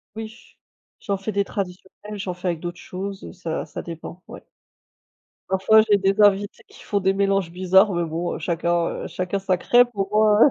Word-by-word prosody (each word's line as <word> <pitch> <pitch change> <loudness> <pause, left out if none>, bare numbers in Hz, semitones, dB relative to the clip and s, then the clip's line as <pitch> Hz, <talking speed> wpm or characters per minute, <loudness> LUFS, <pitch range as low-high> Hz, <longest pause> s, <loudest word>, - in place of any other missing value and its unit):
Oui, 225 +1 -10 0.4
j'en 200 - -2
fais 195 +3 -4
des 200 -1 0
traditionnelles. 195 +2 -6
J'en 185 -1 -3
fais 180 +1 -3
avec 170 -2 -2
d'autres 175 +1 -6
choses, 195 +1 -6
heu, - - -9
ça 170 -3 -4
ça - - -7
dépend, 170 +1 -9
ouais. - - -11 1.1
Parfois, 190 +3 +5
j'ai 205 - +7
des 195 +1 +1
invités 205 0 +3
qui - - -16
font 205 - 0
des 190 0 +2
mélanges 195 -2 +1
bizarres 185 +3 +4
mais 170 0 0
bon, 165 +2 -3
heu, - - -5
chacun, 170 +1 0 0.2
heu, - - -4
chacun, 185 +2 -2
sa 190 -1 0
crêpe, 245 +6 +4
au 195 -1 -1
moins, 215 0 +4
heu - - +4
190 Hz, 200 wpm, -23 LUFS, 175-205 Hz, 1.1 s, j'ai